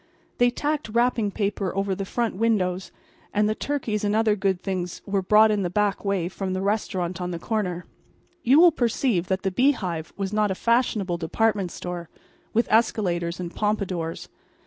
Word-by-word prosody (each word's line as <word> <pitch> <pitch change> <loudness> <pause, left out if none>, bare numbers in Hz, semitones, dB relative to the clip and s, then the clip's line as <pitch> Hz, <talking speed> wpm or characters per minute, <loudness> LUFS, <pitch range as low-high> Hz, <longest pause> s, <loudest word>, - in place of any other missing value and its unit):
They 245 0 +5
tacked 290 +1 -2
wrapping 235 -1 +2
paper 200 -2 -2
over 195 0 0
the 195 +1 -3
front 235 +2 -1
windows; 190 -4 0 0.4
and 210 0 +3
the 215 - +1
turkeys 225 -5 -2
and 205 0 +1
other 220 -1 +3
good 190 -2 0
things 180 -3 -3
were 200 -1 0
brought 215 +3 +5
in 210 -1 +1
the 180 - -1
back 205 +2 0
way 200 -4 0
from 190 +1 -4
the 185 - -2
restaurant 185 -4 -1
on 180 - -2
the 175 - -3
corner. 180 -2 -2 0.6
You 270 +3 +5
will 345 0 +8
perceive 235 - 0
that 190 0 -1
the 190 - 0
Bee 260 +9 +4
Hive 170 - -4
was 195 0 -3
not 210 -1 +2
a 190 - -1
fashionable 220 -6 +1
department 200 +3 0
store, 175 -2 -6 0.4
with 230 +2 +1
escalators 180 -7 +1
and 175 -1 -5
pompadours. 195 -6 -2
200 Hz, 180 wpm, -25 LUFS, 180-220 Hz, 0.6 s, will